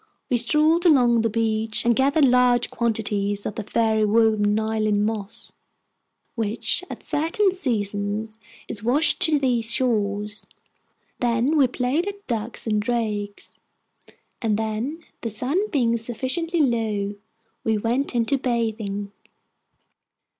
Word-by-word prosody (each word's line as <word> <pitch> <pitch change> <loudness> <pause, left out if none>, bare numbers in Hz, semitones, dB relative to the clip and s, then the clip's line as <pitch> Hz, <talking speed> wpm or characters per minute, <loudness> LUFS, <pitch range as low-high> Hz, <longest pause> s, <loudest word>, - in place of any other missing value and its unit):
We 245 - +4
strolled 305 +8 +3
along 245 -7 +5
the 225 - +1
beach 220 0 0
and 235 0 +4
gathered 280 +4 +3
large 250 -1 +3
quantities 205 -3 -1
of - - -3
the 220 - -4
fairy 220 0 +1
woven 215 -1 +3
Iceland 215 -1 0
moss, 215 -2 -4 0.8
which, 225 - -2
at - - -8
certain 335 +7 +1
seasons, 215 - -2 0.3
is 205 - -7
washed 265 - +2
to 320 -5 +4
these 240 -4 +1
shores; 210 -4 -1 0.7
then 240 +5 +1
we 280 -4 +5
played 255 +8 -1
at 405 0 -7
ducks 230 -1 -3
and 215 -2 +1
drakes, 210 -3 -3 0.9
and 220 -3 +1
then, 225 +9 -3 0.2
the 230 - -3
sun 280 - -1
being 240 - +1
sufficiently 265 +9 -2
low, 220 -6 0 0.5
we 220 -1 +1
went 240 +5 -1
in 235 - +3
bathing. 225 -6 -2
230 Hz, 125 wpm, -23 LUFS, 215-260 Hz, 0.9 s, along